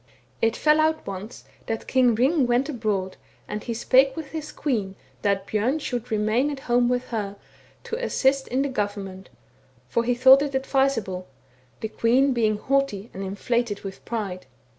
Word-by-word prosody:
It 225 0 +2
fell 305 0 +3
out 315 0 +1
once 200 +4 -7 0.2
that 225 0 -2
the - - -17
King 250 -3 +3
Hring 270 +2 +3
went 245 +3 +2
abroad, 210 -9 -2 0.3
and 210 0 -5
he 235 - -3
spake 265 +3 +4
with 315 -4 -7
his 310 -2 -5
queen 210 -9 -2 0.3
that 200 -1 +1
Bjorn 220 +9 0
should 245 -5 -4
remain 220 +6 +1
at 280 -2 -5
home 240 -1 +2
with 250 0 -1
her, 205 -4 -3 0.5
to 475 +2 -4
assist 270 - +1
in 260 +2 0
the - - 0
government, 200 -6 -4 0.6
for 235 - 0
he 245 +1 +1
thought 260 +2 +7
it 285 -2 -2
advisable, 265 -9 0 0.5
the 220 - -1
queen 255 +5 +2
being 220 -3 +1
haughty 255 -4 -1
and 195 - -6
inflated 205 +2 -1
with 195 -1 -8
pride. 200 -6 -4
240 Hz, 170 wpm, -24 LUFS, 205-270 Hz, 0.6 s, thought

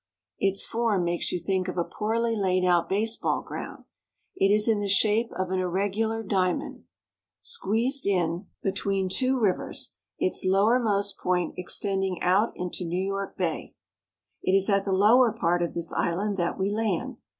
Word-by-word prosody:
Its 195 0 +1
form 225 -5 0
makes 175 0 -1
you - - -1
think 185 +2 -1
of 180 - -5
a 175 - +2
poorly 230 +4 -1
laid 185 -3 +1
out 175 -2 +2
baseball 220 +4 0
ground. - - -7 0.5
It 195 - +2
is 210 +1 +4
in 220 -2 +3
the 205 -1 -2
shape 215 +4 +2
of 185 0 -2
an 190 - 0
irregular 205 +5 -1
diamond, 185 -3 -1 0.5
squeezed 255 - 0
in 200 - +3
6o 175 -3 +1
NEW 170 - -3
YOkK. 190 - -13 0.2
between 195 -1 -1
two 255 +6 +1
rivers, 200 -5 0 0.2
its 185 - +2
lowermost 200 +1 +2
point 180 -2 0
extending 190 0 -1
out 195 +5 +3
into 180 0 -4
New 180 +2 -2
York 195 0 -4
Bay. 175 -4 -3 0.7
It 185 - 0
is 195 +2 +3
at 195 0 +2
thie 195 - -1
lower 220 +6 +5
part 175 -5 0
of 170 - -2
this 170 -1 -3
island 200 +5 -1
that 175 -1 -1
we 195 +1 0
land. 210 -4 -2
195 Hz, 170 wpm, -26 LUFS, 185-215 Hz, 0.7 s, lower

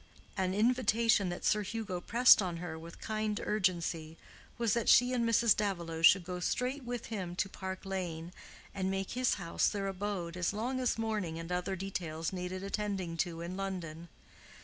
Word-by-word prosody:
An 185 0 0
invitation 225 -3 +3
that 175 - -5
Sir 210 - +3
Hugo 210 -3 -4
pressed 235 +3 +6
on 180 -3 -2
her 165 -2 -6
with 165 +1 -11
kind 215 -1 -2
urgency 170 -5 -1 0.4
was 230 -3 +1
that 235 -2 +1
she 245 +1 +6
and 245 -2 +1
Mrs. 230 -1 +5
Davilow 170 -6 -2
should 180 +3 +7
go 180 +1 -5
straight 255 +9 -1
with 240 -1 -4
him 180 -4 -4
to 190 - 0
Park 190 -1 -6
Lane, 175 -3 -4 0.4
and 190 -1 -1
make 195 0 -2
his 255 0 +1
house 170 -4 0
their 200 -1 -1
abode 195 -3 -3
as 180 +1 0
long 245 +5 -2
as 250 -3 +1
mourning 210 -7 -2
and 165 +1 -6
other 180 +2 -1
details 170 -3 -4
needed 185 +1 -4
attending 195 -4 -2
to 165 -1 -2
in 175 +2 -5
London. 175 -4 -5
190 Hz, 175 wpm, -32 LUFS, 175-215 Hz, 0.4 s, should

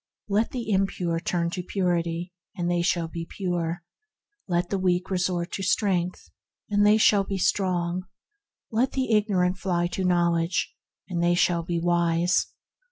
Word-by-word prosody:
Let 215 +2 +1
the 235 -4 -4
impure 185 -3 0
turn 170 0 -1
to 180 - -3
Purity, 175 -2 -1 0.2
and 175 -2 -1
they 175 0 +1
shall 170 -2 +1
be 165 0 -6
pure; 175 -2 -2 0.6
let 175 -1 0
the 195 - 0
weak 185 0 0
resort 180 -1 -1
to - - -4
Strength, 185 -2 0 0.4
andthey 205 +1 +5
shall 205 -2 +5
be 195 0 -3
strong; 180 -1 0 0.6
let 235 +4 +1
the 260 -3 -1
ignorant 190 -4 +2
fly 175 -3 0
to 190 - -3
Knowledge, 170 -1 +1 0.3
and 175 -3 -2
they 175 0 +3
shall 175 -1 +2
be 170 0 -2
wise. 170 0 +2
180 Hz, 150 wpm, -26 LUFS, 170-195 Hz, 0.6 s, andthey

